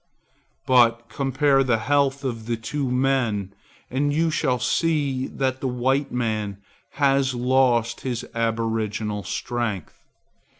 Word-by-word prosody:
But 120 -2 +4
compare 135 0 +2
the 120 -3 +2
health 140 +3 +1
of 115 -4 -4
the 120 -1 -1
two 135 +4 -3
men 125 -7 0 0.4
and 145 +3 +1
you 160 +2 +1
shall 130 -5 +1
see 140 -2 0
that 130 -1 -2
the 135 - -1
white 130 +3 0
man 110 -5 -2 0.4
has 135 -2 +2
lost 120 -2 +2
his 125 -3 -3
aboriginal 110 -2 -1
strength. 105 -2 -4
125 Hz, 120 wpm, -24 LUFS, 115-135 Hz, 0.4 s, But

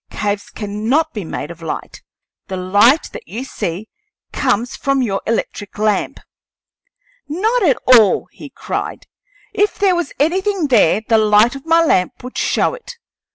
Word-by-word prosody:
"Caves 205 0 -3
cannot 225 +10 -1
be 210 - -4
made 160 -1 -6
of 170 0 -12
light; 160 - -6 0.5
the 190 - -4
light 205 - +3
that 485 - -9
you 240 +4 -5
see 195 -5 -5 0.5
comes 245 -2 0
from 275 -1 0
your 195 -4 -2
electric 215 -2 -3
lamp." 210 -2 0 1.1
"Not 435 +11 0
at 300 -10 +3
all!" 235 -5 +5
he - - -11
cried. - - -5 0.5
"If 420 0 +1
there 395 -2 +3
was 345 -4 -2
anything 370 +2 0
there, 215 -5 +4
the 225 -1 +4
light 215 +3 +4
of 275 +3 -10
my 330 +1 +4
lamp 185 - 0
would 250 - -9
show - - +1
it. - - -10
240 Hz, 155 wpm, -18 LUFS, 205-320 Hz, 1.1 s, all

